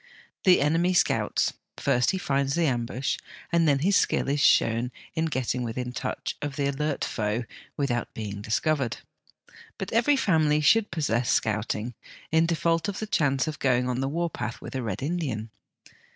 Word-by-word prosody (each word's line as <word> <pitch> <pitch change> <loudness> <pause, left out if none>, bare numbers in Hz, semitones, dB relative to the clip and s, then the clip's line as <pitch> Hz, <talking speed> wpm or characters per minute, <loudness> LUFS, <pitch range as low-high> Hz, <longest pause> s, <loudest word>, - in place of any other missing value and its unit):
The 180 -5 +6
enemy 165 +5 +2
scouts; - - +2 0.2
first 125 0 +2
he 190 - +1
finds 140 -5 0
the 170 -1 +2
ambush, 125 -1 -1 0.3
and 170 -1 +3
then 140 -2 +4
his 200 +1 +4
skill - - +2
is 145 +1 +1
shown 115 -2 +3 0.2
in 160 0 0
getting 130 -5 -1
within 125 +1 -3
touch - - -3
of 145 -1 -4
the 140 -1 0
alert 140 +1 -1
foe 105 +2 -1 0.3
without 120 -4 -1
being 105 -2 -5
discovered. 125 +4 0 0.8
But - - -5
every 235 +6 +4
family 160 - +3
should 205 +9 +4
possess 125 -8 0
Scouting 110 +2 0 0.4
in 160 +1 +4
default 165 +1 +1
of 200 - -4
the 215 - -3
chance 145 -8 +1
of 155 -2 -4
going 125 -2 +2
on 125 0 -1
the 135 - -1
war 170 +3 -1
path 120 -3 -5
with - - -9
a 130 - -2
Red 110 -1 -4
Indian. 135 -9 -2
140 Hz, 170 wpm, -26 LUFS, 120-165 Hz, 0.8 s, The